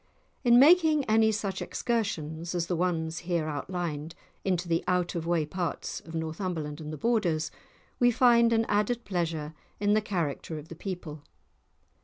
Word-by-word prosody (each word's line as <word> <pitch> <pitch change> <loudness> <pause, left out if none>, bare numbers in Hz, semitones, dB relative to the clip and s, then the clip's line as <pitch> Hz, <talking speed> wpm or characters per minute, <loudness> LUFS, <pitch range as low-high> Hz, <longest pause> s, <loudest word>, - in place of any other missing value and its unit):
In 240 -2 +6
making 310 0 +6
any 220 0 +4
such 200 -3 -3
excursions 170 -8 -2
as 170 -1 0
the 175 - -1
ones 165 -1 -1
here 170 -2 -1
outlined, 155 0 -4 0.3
into 180 -2 0
the 165 -1 +1
out 180 -1 +1
of 165 -2 -3
the - - -3
way 165 -3 +2
parts 175 +2 -3
of 165 - -10
Northumberland 160 -1 -3
and 150 0 -6
the 155 - -5
Borders, 170 -7 +1 0.5
we 245 - +5
find 235 -1 +5
an 225 0 +3
added 215 +3 0
pleasure 165 -5 -2 0.3
in 205 0 +2
the 215 - +3
character 165 -6 -3
of 150 +1 -10
the 165 - -8
people. 170 -4 -6
175 Hz, 165 wpm, -28 LUFS, 160-215 Hz, 0.5 s, In